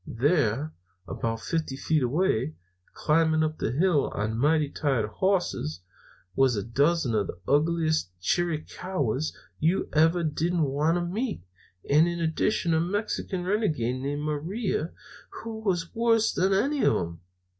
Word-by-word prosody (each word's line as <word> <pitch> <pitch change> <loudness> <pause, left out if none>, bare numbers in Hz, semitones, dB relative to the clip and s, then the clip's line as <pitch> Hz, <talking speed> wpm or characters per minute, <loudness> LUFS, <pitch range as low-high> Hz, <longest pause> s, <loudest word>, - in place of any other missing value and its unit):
There, 145 +1 +1 0.3
about 115 0 -3
fifty 160 -5 -2
feet 155 +1 +1
away, 140 0 +1 0.4
climbing 160 0 +2
up 155 0 -2
the - - -1
hill 160 +2 +2
on 110 +2 -1
mighty 150 +5 +2
tired 135 -9 0
hosses, 110 - -1 0.5
was 135 -3 +3
a 100 - -2
dozen 140 +2 +1
of 105 -3 +1
the - - -7
ugliest 155 - +2
Chiricahuas 155 - -1 0.3
you 165 +5 +1
ever 165 +3 +4
don't 165 +2 0
want 150 +4 +1
to 175 - -1
meet, 210 - -3 0.4
and 155 +4 +5
in 170 0 -2
addition 165 +2 +1
a 160 - +3
Mexican 190 0 -2
renegade 155 - 0
named 145 +2 -3
Maria, 165 +4 -2 0.5
who 225 -1 -5
was 180 -6 -1
worse 225 -1 +2
than 190 +2 +1
any 270 +9 +1
of - - +4
'em. 85 0 -3
160 Hz, 140 wpm, -27 LUFS, 135-180 Hz, 0.5 s, and